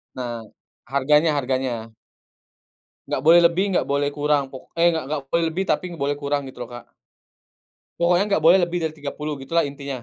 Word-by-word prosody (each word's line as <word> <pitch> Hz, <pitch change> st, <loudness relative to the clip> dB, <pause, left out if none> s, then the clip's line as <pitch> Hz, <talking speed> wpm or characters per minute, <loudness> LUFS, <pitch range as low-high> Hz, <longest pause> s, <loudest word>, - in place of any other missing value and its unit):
Nah. 120 Hz, -3 st, -5 dB, 0.4 s
Harganya 150 Hz, +4 st, +3 dB
harganya. 130 Hz, -4 st, -2 dB, 1.2 s
Nggak 130 Hz, -, -2 dB
boleh 165 Hz, +2 st, +7 dB
lebih, 170 Hz, +2 st, +3 dB
nggak -, -, +1 dB
boleh 140 Hz, 0 st, +1 dB
kurang. 145 Hz, 0 st, +1 dB
Pok 130 Hz, -, -11 dB
eh, 170 Hz, +1 st, +4 dB
nggak 160 Hz, -1 st, -2 dB
nggak 150 Hz, 0 st, -2 dB
boleh 170 Hz, -, +2 dB
lebih, 165 Hz, +4 st, -2 dB
tapi 170 Hz, -1 st, 0 dB
boleh 145 Hz, -1 st, -1 dB
kurang 145 Hz, 0 st, -1 dB
gitu 130 Hz, -, -11 dB
loh -, -, -20 dB
Kak. 120 Hz, -, -9 dB, 1.1 s
Pokoknya 175 Hz, +2 st, +2 dB
nggak 195 Hz, -7 st, 0 dB
boleh 170 Hz, +4 st, +7 dB
lebih 175 Hz, 0 st, 0 dB
dari 160 Hz, -, 0 dB
RM30, 150 Hz, +1 st, -5 dB
gitulah 165 Hz, +5 st, 0 dB
intinya. 140 Hz, -3 st, -6 dB
145 Hz, 175 wpm, -22 LUFS, 135-170 Hz, 1.2 s, boleh